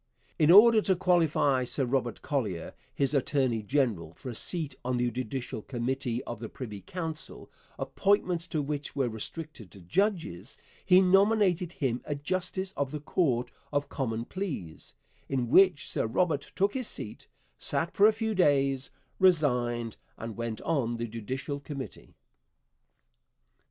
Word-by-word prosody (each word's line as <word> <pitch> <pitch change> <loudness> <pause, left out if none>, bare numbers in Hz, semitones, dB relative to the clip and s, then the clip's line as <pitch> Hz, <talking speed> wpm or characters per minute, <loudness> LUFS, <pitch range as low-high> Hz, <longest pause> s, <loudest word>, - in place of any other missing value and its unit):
In 155 - +4
order 215 +4 +8
to 190 -2 +2
qualify 165 -7 +2
Sir 130 +2 -1
Robert 120 -2 -1
Collier, 105 - -2 0.2
his 140 0 0
attorney 130 -4 +1
general, 105 - 0
for 130 - -8
a - - -5
seat 155 +4 -1
on 125 0 -1
the 120 0 +1
Judicial 125 -1 -4
Committee 125 0 -2
of 120 - -6
the 115 -1 -6
Privy 110 -8 -7
Council, 165 - -4 0.3
appointments 185 -4 +1
to 155 -5 -1
which 145 0 -4
were 135 -3 +1
restricted 120 - -6
to 100 - -13
judges, 140 - -1 0.3
he 185 0 +6
nominated 190 -2 +3
him 125 -5 -1
a 145 - -2
justice 185 +5 -2
of 140 -2 -1
the 150 +2 -5
Court 140 -5 0 0.2
of 145 -1 -1
Common 115 -4 -2
Pleas, 145 - -6 0.3
in 130 -3 -1
which 185 +1 +5
Sir - - -1
Robert 145 +4 0
took 200 +2 +2
his 255 -4 -2
seat, 105 - -4 0.3
sat 170 - -2
for 205 - +7
a - - +6
few 220 0 -2
days, 140 -7 +2 0.3
resigned, 125 - +2 0.2
and 115 -1 -6
went 115 -2 -4
on 125 -8 0
the 120 - -2
Judicial 130 +6 -4
Committee. 140 -2 -8
140 Hz, 145 wpm, -29 LUFS, 120-180 Hz, 0.3 s, order